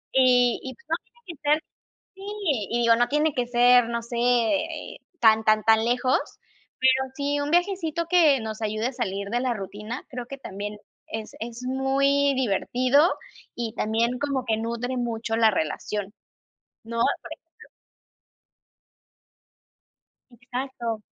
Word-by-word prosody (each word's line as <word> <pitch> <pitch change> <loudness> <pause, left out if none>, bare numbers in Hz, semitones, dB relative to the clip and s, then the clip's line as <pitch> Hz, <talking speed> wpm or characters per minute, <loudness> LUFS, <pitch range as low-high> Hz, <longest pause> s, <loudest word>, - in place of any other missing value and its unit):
Y 250 -2 +4
y, 260 - -6
pues, 470 - -25
no - - +2
tiene 475 - -30
que 340 - -7
ser 300 +1 +3 0.5
Sí, 385 - -14 0.5
y 235 - 0
digo, 230 0 +6
no 240 +1 +1
tiene 300 +1 +1
que 250 -2 -1
ser, 245 0 +5
no 235 0 -2
sé, 235 +1 -8
eh, 245 +7 0 0.2
tan, 220 -1 +5
tan, 215 0 +3
tan 220 0 +5
lejos, 250 +2 +2 0.6
pero 260 0 +3
sí, 285 +1 -1
un 290 +1 -2
viajecito 345 -2 +1
que 320 -7 +5
nos 220 -1 -6
ayude 215 +1 -1
a 260 - -5
salir 200 -5 -3
de 240 +3 0
la 255 -1 0
rutina, 210 +4 -6
creo 250 -1 -6
que 275 +3 -8
también 210 -4 -6 0.3
es 220 -1 -6
es 235 +2 -6
muy 275 +2 +2
divertido, 255 - +2 0.4
y 230 -2 -4
también 230 +3 0
como 275 -2 -2
que 225 -2 +1
nutre 235 +3 -3
mucho 230 -2 -2
la 225 -1 +4
relación, 200 +4 -3 0.7
¿no? 230 +1 -5 0.2
por - - -11
ejemplo - - -19 2.6
Exacto. 245 -2 -5
245 Hz, 150 wpm, -25 LUFS, 225-275 Hz, 2.6 s, digo